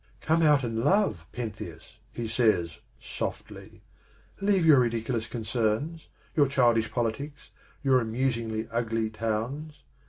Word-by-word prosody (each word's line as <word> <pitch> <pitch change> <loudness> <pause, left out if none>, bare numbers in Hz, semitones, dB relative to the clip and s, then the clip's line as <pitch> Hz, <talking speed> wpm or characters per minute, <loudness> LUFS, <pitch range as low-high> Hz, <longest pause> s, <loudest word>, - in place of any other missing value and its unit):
" - - -31
Come 160 +1 +2
out 150 -4 +5
and 115 -2 -2
love, 145 - +2
Pentheus," 110 -1 -7
he 115 -1 -4
says 110 - +1 0.2
softly; - - -6 0.6
"leave 195 -3 +2
your 150 -4 +7
ridiculous 115 -1 0
concerns, 115 +7 -2 0.3
your 145 -3 +5
childish 120 -4 +2
politics, 130 +5 -3 0.3
your 130 -2 +4
amusingly 115 -1 -1
ugly 115 -1 -1
towns. 115 +8 -3
120 Hz, 120 wpm, -28 LUFS, 110-140 Hz, 0.6 s, your